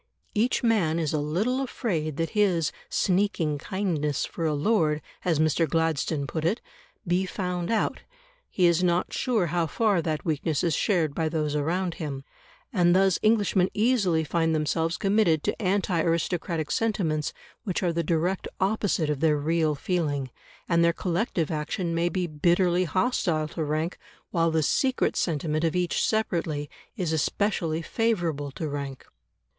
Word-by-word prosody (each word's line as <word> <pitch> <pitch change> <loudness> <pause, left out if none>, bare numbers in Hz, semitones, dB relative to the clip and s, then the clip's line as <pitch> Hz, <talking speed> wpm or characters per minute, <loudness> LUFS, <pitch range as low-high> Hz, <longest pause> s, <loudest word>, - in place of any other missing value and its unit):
Each 235 +5 +1
man 200 -9 +2
is 160 -3 -1
a 155 - +1
little 200 - 0
afraid 165 - -2
that 165 0 -1
his 185 -7 +2 0.2
"sneaking 180 -6 +1
kindness 160 -6 -1
for 165 -2 -3
a 150 - 0
lord," 155 -2 +2 0.2
as 170 -4 +1
Mr. 155 +1 +2
Gladstone 160 -2 0
put 155 +3 -4
it, 185 +9 +1 0.5
be 180 +2 +1
found 180 -2 -3
out; 225 - 0 0.5
he 180 - +2
is 170 +1 +3
not 175 0 +1
sure 230 -8 +1
how 170 -2 +1
far 205 +1 +2
that 155 -1 -3
weakness 155 -2 0
is 170 -2 +2
shared 165 -4 +1
by 160 +1 0
those 155 -2 -1
around 170 +4 0
him. 140 -3 -4 0.5
And 175 -3 +4
thus 190 -1 +3
Englishmen 205 -4 +3
easily 205 -8 +2
find 165 +1 +1
themselves 160 +2 0
committed 195 -6 +2
to - - -2
anti 185 -3 +1
aristocratic 165 -1 -1
sentiments 170 -9 0 0.3
which 190 -3 -2
are 175 -2 +1
the 170 - 0
direct 170 +3 0
opposite 190 -6 +1
of 145 - -2
their 155 -1 +3
real 155 +1 +1
feeling, 145 -5 -1 0.4
and 170 -1 +3
their 170 0 +4
collective 175 -2 -1
action 165 +3 -2
may 170 +1 +1
be 180 +1 -1
bitterly 175 +3 +2
hostile 170 - 0
to 160 - -3
rank 155 +3 -2 0.3
while 165 -2 +2
the 160 -1 +1
secret 260 - +1
sentiment 155 -1 -1
of 165 0 +1
each 180 -1 +1
separately 165 -9 -1 0.3
is 175 -5 -1
especially 165 0 0
favourable 170 -11 -1
to 160 - -4
rank. 140 -2 -5
170 Hz, 155 wpm, -26 LUFS, 155-190 Hz, 0.5 s, And